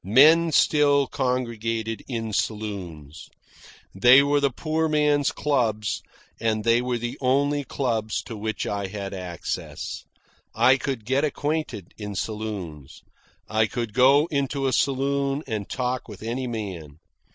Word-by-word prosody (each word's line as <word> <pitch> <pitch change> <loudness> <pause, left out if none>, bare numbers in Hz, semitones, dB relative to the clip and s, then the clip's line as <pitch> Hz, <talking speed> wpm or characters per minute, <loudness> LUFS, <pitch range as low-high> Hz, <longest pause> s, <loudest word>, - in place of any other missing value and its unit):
Men 155 - +6
still 145 -2 +4
congregated 115 -4 -2
in 115 -4 -4
saloons. 90 -10 -4 0.6
They 125 +8 +7
were 145 +1 +2
the 140 0 +2
poor 160 +4 -1
man's 150 -1 +2
clubs, 115 -10 0 0.4
and 110 -1 0
they 115 +1 +3
were 125 -1 -1
the 120 +1 -5
only 140 +3 +2
clubs 115 -5 -2
to 115 - -8
which 110 +1 -3
I 100 -1 -2
had 100 0 -6
access. 90 -3 -5 0.5
I 130 +1 +5
could 130 -5 -4
get 135 +4 +1
acquainted 150 - -2
in 105 -1 -5
saloons. 95 -10 -5 0.4
I 110 0 +2
could 115 -3 -4
go 135 +5 +5
into 140 -1 -1
a 130 - +1
saloon 140 +2 0
and 110 -5 -4
talk 125 0 -2
with 105 -1 -10
any 125 +3 -3
man. 95 -10 -6
120 Hz, 135 wpm, -25 LUFS, 105-140 Hz, 0.6 s, They